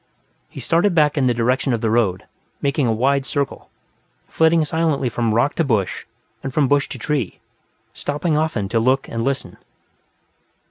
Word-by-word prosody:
He - - -10
started 175 +2 +2
back 150 -2 +3
in 135 -4 +2
the 125 - +3
direction 125 +3 +1
of 115 - -1
the 110 -2 0
road, 105 -6 +1 0.4
making 140 -1 0
a - - +2
wide 135 +5 +1
circle, 140 +1 -3 0.6
flitting 160 0 +3
silently 155 -4 0
from 115 0 -1
rock 120 +5 +2
to 165 - +3
bush 110 - -1 0.4
and 135 - -4
from 140 +1 +2
bush 145 +1 +2
to - - -6
tree, 140 - -2 0.5
stopping 150 +2 -2
often 150 -10 0
to 115 - +1
look 130 +4 +1
and 115 0 -3
listen. 135 +1 -2
135 Hz, 170 wpm, -20 LUFS, 115-150 Hz, 0.6 s, back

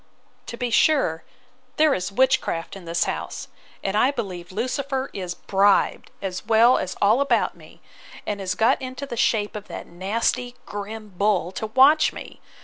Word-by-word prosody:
To 235 - -6
be 245 -1 -2
sure, 230 - +3 0.5
there 310 -2 +4
is 180 -2 -2
witchcraft 250 -8 +1
in 190 -3 -11
this 170 0 0
house; - - -5 0.3
and 195 - -1
I 245 +5 +4
believe 185 -10 -5
Lucifer 260 +5 -2
is 180 -2 -5
bribed, 200 +1 +2
as 185 -2 -4
well 230 +3 +5
as 185 - -4
all 215 +6 +4
about 280 - +1
me, - - -17 0.4
and 205 -1 -3
is 185 0 -2
got 225 +5 +2
into 260 +2 -6
the 275 - -6
shape 215 -3 +1
of 210 0 -7
that - - -7
nasty 230 +7 -2
grim 210 +1 -7
bull 195 -3 +1
to 220 - -4
watch 270 +7 +5
me! - - -10
215 Hz, 165 wpm, -23 LUFS, 190-255 Hz, 0.5 s, well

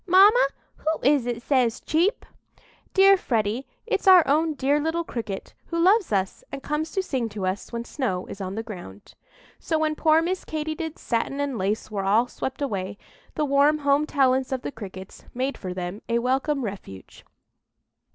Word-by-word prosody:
"Mamma, 390 - +6 0.3
who 315 +1 -1
is 275 -2 +3
it 240 -1 -3
says 250 -4 +2
'cheep'?" 355 +10 0 0.7
"Dear 390 0 +7
Freddy, 230 - -1 0.2
it's 455 - -1
our 365 -5 +8
own 310 +2 +2
dear 280 +2 +2
little 320 +3 -1
cricket, 225 -10 -6
who 335 - -3
loves 380 - +4
us 195 -2 -1
and 275 0 -6
comes 300 +2 -2
to 385 - 0
sing 255 -9 -2
to 205 -2 -4
us 185 +2 -3
when 235 -1 -3
the - - -16
snow 205 -11 -2
is 200 - -9
on 190 0 -4
the 225 - -3
ground." 175 - -10 0.5
So 320 - -1
when 310 0 +1
poor 315 +1 +4
Miss 370 +2 -2
Katy 310 0 -3
did's 320 0 -6
satin 240 +4 -1
and 285 -2 -1
lace 210 +2 -2
were 200 -2 -2
all 215 +5 +3
swept 265 +3 -5
away, 200 -6 -3 0.4
the 300 - +1
warm 285 +2 +4
home 285 +1 +2
talents 265 -2 +2
of 260 -1 -2
the - - -4
Crickets 190 -5 -10
made 260 +3 -1
for 185 - -6
them 180 +2 -5
a 235 - +2
welcome 265 +3 0
refuge. 190 - -9
265 Hz, 185 wpm, -25 LUFS, 215-310 Hz, 0.7 s, our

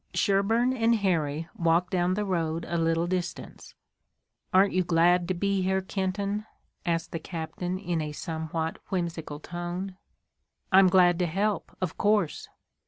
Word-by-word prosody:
Sherburne 225 +6 +2
and 230 -2 +3
Harry 165 -6 0
walked 170 +2 +2
down 180 0 +1
the 210 +1 -1
road 165 -3 -1
a 170 - -3
little 165 0 +1
distance. 180 0 -5 0.8
"Aren't 195 +2 +4
you 185 0 +2
glad 175 +1 +3
to 185 - -1
be 200 +2 0
here, 190 +1 +1
Kenton?" 200 +2 -2 0.4
asked 165 -1 -1
the 165 - -3
captain 170 +2 -4
in 175 -4 -2
a 150 -1 -4
somewhat 160 +1 -4
whimsical 170 -5 -3
tone. 175 +3 -5 0.7
"I'm 190 0 +7
glad 180 -1 +5
to 180 - +2
help, 200 +5 -1
of 180 -3 -3
course." 205 -6 +1
180 Hz, 145 wpm, -27 LUFS, 165-195 Hz, 0.8 s, I'm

